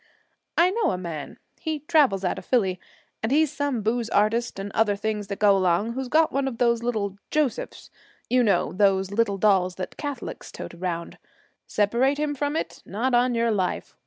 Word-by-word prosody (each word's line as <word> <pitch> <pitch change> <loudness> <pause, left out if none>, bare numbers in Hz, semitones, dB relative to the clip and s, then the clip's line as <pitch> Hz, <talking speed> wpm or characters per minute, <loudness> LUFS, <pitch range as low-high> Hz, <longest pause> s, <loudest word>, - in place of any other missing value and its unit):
'I 350 +2 +5
know 430 -3 +1
a 185 - -1
man, 165 -5 -6 0.2
he 310 -2 -3
travels 285 - +3
out - - -1
of - - -14
Phillie, 190 -8 +1 0.4
and 220 - -1
he's 300 0 +3
some 285 -7 -1
booze 230 +1 0
artist 220 +3 +1
and 195 +1 -5
other 210 -1 +2
things 210 0 -3
that 200 - -4
go 205 -1 +5
along, 190 +4 +1
who's 265 +1 -3
got 315 +5 +3
one 275 0 0
of 250 -4 -4
those 235 -1 +2
little 210 -5 -2
"Josephs." 300 -5 -2 0.4
You 255 0 +3
know, 215 -5 +2
those 195 -1 +2
little 205 -1 +1
dolls 185 -3 +3
that 185 - -6
Catholics 285 -4 -6
tote - - -8
around? 170 -1 -4 0.5
Separate 235 +7 +2
him 300 0 -1
from 290 +1 -2
it? - - -4
Not 240 +6 -2
on 245 0 +3
your 230 0 +2
life. 190 -4 -2
230 Hz, 190 wpm, -25 LUFS, 195-265 Hz, 0.5 s, I